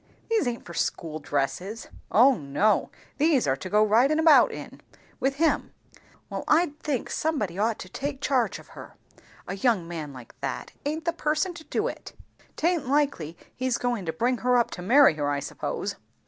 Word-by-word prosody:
"These 435 - +2
aint 235 -1 -4
for 170 - -9
school 155 -2 -2
dresses." 170 +10 -3 0.2
"O 255 +6 +6
no; 150 +7 +1 0.3
these 300 -4 +3
are 130 - +2
to 185 - -7
go 210 +2 +4
ridin' 240 +8 +4
about 320 -1 +6
in, - - -9 0.4
with 270 +1 0
him." 320 +2 +1 0.5
"Well - - -5
I 320 -1 +3
think, 280 -6 -2
somebody 210 - -1
ought 220 +1 +1
to - - -8
take 275 +7 -4
charge 265 -4 +1
of - - -15
her. - - -12 0.5
A 195 - -4
young 200 -6 +1
man 160 -4 -5
like 125 -3 -12
that, - - -4 0.2
aint 315 +3 -3
the 335 - +1
person 310 +4 0
to 340 -2 -11
do - - -1
it - - -7 0.4
Taint 330 -4 0
likely 275 - 0 0.2
he's 255 -1 0
goin' 240 -7 -2
to - - +1
bring 240 +9 0
her 250 0 +3
up 240 0 +2
to 180 - -6
marry 260 - +6
her, 145 -1 0
I 145 -1 0
suppose." - - -4
240 Hz, 185 wpm, -26 LUFS, 180-290 Hz, 0.5 s, O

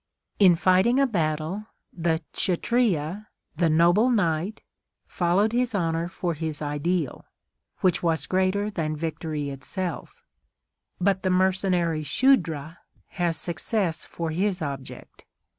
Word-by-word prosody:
In 185 -4 +7
fighting 185 +8 +3
a 275 - +5
battle, 170 - -2 0.3
the 165 -1 -1
Kshatriya, 195 -2 0 0.3
the 170 -1 +3
noble 175 +9 +4
knight, 185 -2 0 0.4
followed 185 +5 +1
his 245 -2 0
honour 165 -2 0
for 175 -1 -3
his 155 -1 -4
ideal, 150 +1 -2 0.6
which 185 -3 +2
was 165 -2 0
greater 190 +3 0
than 155 -5 -2
victory 155 -2 -3
itself; 165 +6 -6 0.8
but 190 +1 +2
the 185 - 0
mercenary 185 -3 +1
Shudra 165 - +1 0.3
has 175 -3 -1
success 170 +2 -2
for 165 -1 -4
his 190 +3 0
object. 140 -3 -7
175 Hz, 115 wpm, -25 LUFS, 160-195 Hz, 0.8 s, In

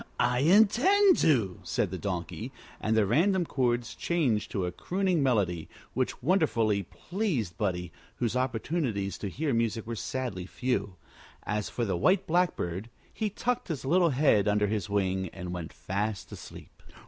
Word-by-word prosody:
"I 125 0 +2
intended 235 - +5
to," 115 - +2
said - - -1
the - - -3
Donkey; 90 +4 -4 0.3
and 110 +1 +1
the 110 - +4
random 175 - +3
chords 120 -5 0
changed 135 -12 0
to 95 -3 -1
a 90 - -2
crooning 180 - 0
melody 100 - +1 0.2
which - - -2
wonderfully 120 - +2
pleased 145 - -3
Buddie, 90 -4 -2 0.2
whose 120 -1 -1
opportunities 125 - -1
to 100 - -3
hear 145 - -1
music 115 -1 0
were 115 +1 -4
sadly 105 -4 -4
few. 105 -5 -2 0.5
As 105 -1 -2
for 120 - -2
the 95 -4 -1
White 185 - +3
Blackbird, 120 - 0 0.2
he 215 - -1
tucked 245 +4 -2
his 155 -7 -4
little 170 +4 +4
head 125 -7 +3
under 105 0 +3
his 105 -3 -2
wing 95 -2 0
and 90 0 -6
went 85 -2 -5
fast 100 +2 -3
asleep. - - -11
115 Hz, 155 wpm, -29 LUFS, 100-160 Hz, 0.5 s, intended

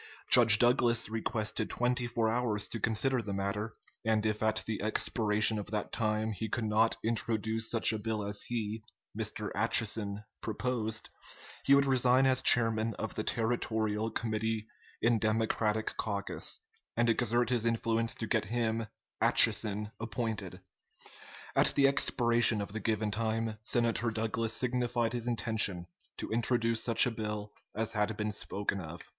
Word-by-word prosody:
Judge 115 -4 +8
Douglas 120 -1 +3
requested 110 -1 -2
twenty 120 0 0
four 120 -1 0
hours 110 -3 0
to 115 - -4
consider 120 +4 +1
the 100 -3 -5
matter, 105 +3 -3 0.3
and 110 -1 +1
if 105 -1 -1
at 110 0 0
the 110 -2 -3
expiration 110 0 +1
of 105 - -6
that 105 -1 -3
time 110 -1 0
he 110 +1 -4
could 120 - -2
not 110 +1 +2
introduce 110 -1 -1
such 115 -1 +2
a 110 - -3
bill 110 -1 -2
as 100 0 -2
he 110 -2 -4 0.3
(Mr. - - -3
Atchison) 105 -2 0 0.2
proposed, 110 0 -2 0.6
he 140 - +6
would 140 0 +4
resign 130 0 +3
as 130 -1 +3
chairman 115 -2 +3
of 110 - -5
the 110 - -3
Territorial 110 -2 -1
Committee 110 -1 -2 0.4
in 115 -1 +3
Democratic 110 0 0
caucus, 100 -2 -2 0.4
and 120 0 +3
exert 120 +1 +2
his 120 -3 +1
influence 115 0 0
to 115 - -4
get 110 -2 0
him 115 -1 -1 0.3
(Atchison) 105 -1 +3
appointed. 110 -5 -4 0.9
At - - +3
the 140 -1 +5
expiration 120 -4 +3
of 100 0 -5
the 110 - -3
given 110 0 -1
time, 110 0 -2
Senator 115 0 +1
Douglas 115 0 -1
signified 120 -1 0
his 120 -1 -3
intention 110 -6 0 0.3
to - - -5
introduce 115 0 +1
such 115 -2 +5
a 125 - 0
bill 105 -2 -5 0.2
as 110 +1 -1
had 105 0 -1
been 105 0 -2
spoken 100 -1 -2
of." 85 +1 -9
110 Hz, 150 wpm, -31 LUFS, 105-115 Hz, 0.9 s, Judge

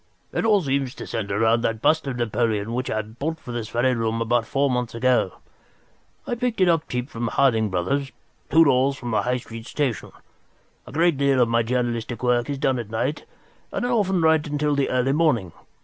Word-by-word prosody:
"It - - -1
all 210 -4 +4
seems 135 -2 -1
to - - -7
centre 100 -3 -3
round 115 +2 +3
that 115 -1 0
bust 155 +5 +2
of 135 - -2
Napoleon 115 -2 -1
which 125 +1 -2
I 110 0 -1
bought 140 +10 -4
for 125 - -9
this 115 -2 -4
very 125 +3 +1
room 115 -1 -1
about 115 0 +1
four 140 0 +1
months 125 -3 -2
ago. 125 -5 +2 0.9
I - - -3
picked 240 -2 -2
it 185 - +4
up 165 -2 +1
cheap 125 0 -2
from 120 -6 -4
Harding 115 -4 +2
Brothers, 115 +10 -1 0.4
two 165 +3 +6
doors 135 0 +3
from 120 -2 -5
the 110 - +2
High 125 +1 0
Street 115 -1 -9
Station. 135 -8 -2 0.8
A - - -9
great 165 +1 +2
deal 140 -1 +2
of 120 -2 +3
my 115 0 +3
journalistic 120 0 -2
work 125 +1 +1
is 140 - -2
done 135 -2 +1
at 115 -3 -6
night, 125 +7 -2 0.5
and - - -2
I - - -1
often 195 -7 +1
write 160 -2 +3
until 150 0 0
the 140 -1 +1
early 125 +1 +1
morning. 130 - +1
125 Hz, 210 wpm, -23 LUFS, 115-145 Hz, 0.9 s, two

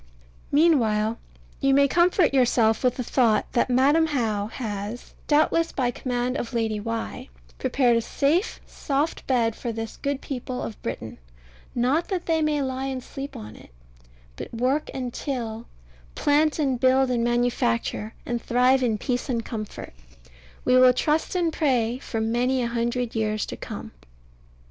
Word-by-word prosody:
Meanwhile 230 -9 +3 0.4
you 275 0 +3
may 280 0 +5
comfort 345 0 +3
yourself 235 -4 +3
with 250 -1 +2
the 250 - -3
thought 235 -3 +2
that 240 - +1
Madam 285 +6 +4
How 220 -8 -1
has 215 -1 -6
(doubtless 315 +2 +3
by 250 -3 0
command 250 +1 -2
of 240 -2 -5
Lady 220 -2 0
Why) 225 - -5 0.3
prepared 245 -3 +2
a 230 - +2
safe 305 - 0
soft 290 +2 -2
bed 230 -4 +2
for 240 - -4
this 225 0 -6
good 280 -1 -2
people 255 -2 -5
of 220 - -7
Britain 110 - -6 0.6
not 260 +8 +1
that 370 -3 -3
they 325 -1 +1
may 300 -2 +1
lie 260 0 -3
and 260 -2 -4
sleep 275 +1 -7
on 105 0 -9
it, - - -15 0.7
but - - -7
work 255 +6 0
and 250 -2 -4
till, 235 -5 -4 0.5
plant 295 +1 +2
and 270 -5 0
build 260 0 +3
and 235 -1 +1
manufacture, 235 - 0
and 240 -1 -2
thrive 250 +2 +3
in 230 -4 +1
peace 250 +5 -2
and 235 -3 -1
comfort, 215 - -6 0.7
we 250 - +5
will 255 0 +7
trust 305 +7 0
and 340 -3 +1
pray, 250 -6 +1
for 230 -4 -4
many 245 +3 +1
a - - 0
hundred 235 0 -1
years 215 -1 -1
to - - -6
come. - - -7
250 Hz, 160 wpm, -25 LUFS, 230-275 Hz, 0.7 s, will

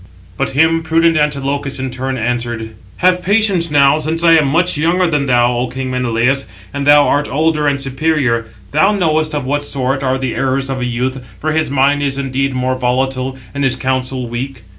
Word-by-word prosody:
But - - -1
him 165 +2 +3
prudent 165 +1 +2
Antilochus 140 -2 -1
in 130 -1 -4
turn 130 +1 -3
answered: 120 -1 -3 0.3
"Have 180 0 +4
patience 195 -3 +2
now, 145 0 +4
since 160 +2 -2
I 165 -1 +6
am 155 -3 +4
much 170 +6 +1
younger 170 +5 +1
than 150 -5 0
thou, 120 -1 +3
O 125 +1 -1
king 130 +1 -5
Menelaus, 125 +2 0 0.3
and 140 0 -3
thou 145 0 +6
art 145 +1 +1
older 155 0 +1
and 140 -1 +1
superior. 135 -4 0 0.2
Thou 200 +2 +3
knowest 155 -5 0
of 145 -3 -2
what 145 +2 -1
sort 135 -1 -2
are 130 -1 0
the 130 -2 -3
errors 135 0 -1
of 130 - -3
a 125 - -2
youth; 125 +2 -2 0.2
for 155 - -1
his 160 0 0
mind 140 +1 +2
is 140 -1 -1
indeed 135 0 -2
more 130 0 0
volatile, 130 +1 -1 0.2
and 140 0 -2
his 130 -2 +2
counsel 130 -1 -2
weak. 120 0 -6
135 Hz, 195 wpm, -16 LUFS, 130-155 Hz, 0.3 s, I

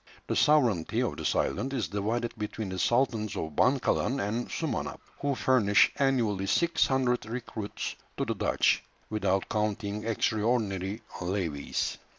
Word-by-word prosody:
The - - -2
sovereignty 125 - +3
of - - -2
this - - 0
island 135 +2 0
is 120 -6 -1
divided 115 +4 -1
between 105 -1 -4
the 95 0 -4
sultans 115 -3 +1
of 80 -2 -4
Bankalan 130 - +2
and 110 +3 -2
Sumanap, 155 -8 -3 0.2
who 140 -1 0
furnish 110 -7 +4
annually 115 -8 +1
six 170 - +3
hundred 125 -4 +1
recruits 115 -3 -5 0.2
to - - 0
the - - -1
Dutch, - - +2 0.3
without 100 -3 +1
counting 105 0 -1
extraordinary 110 -3 0 0.2
levies. 90 -6 -2
110 Hz, 135 wpm, -29 LUFS, 100-125 Hz, 0.3 s, furnish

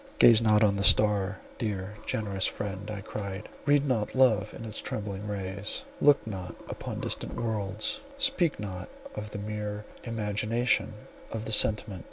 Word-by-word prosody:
"Gaze 115 -1 +7
not 110 -1 +4
on 105 -2 +4
the 100 - 0
star, 105 -2 +5 0.2
dear, 105 -3 -3
generous 100 -3 0
friend," 100 0 -4
I 105 -2 -4
cried, 100 0 -5 0.2
"read 145 0 +4
not 115 -4 0
love 130 -5 +4
in 115 - -8
its 110 -1 -2
trembling 105 -1 -4
rays; 100 0 -4 0.2
look 145 -1 +5
not 95 -5 -6
upon - - -5
distant - - -2
worlds; 110 - -1 0.2
speak 270 - +2
not 95 -3 -6 0.2
of 105 0 -5
the 105 - -6
mere 105 0 -4 0.2
imagination 110 +1 0 0.4
of 110 0 -4
a - - -3
sentiment. 105 -2 +4
105 Hz, 155 wpm, -29 LUFS, 100-110 Hz, 0.4 s, Gaze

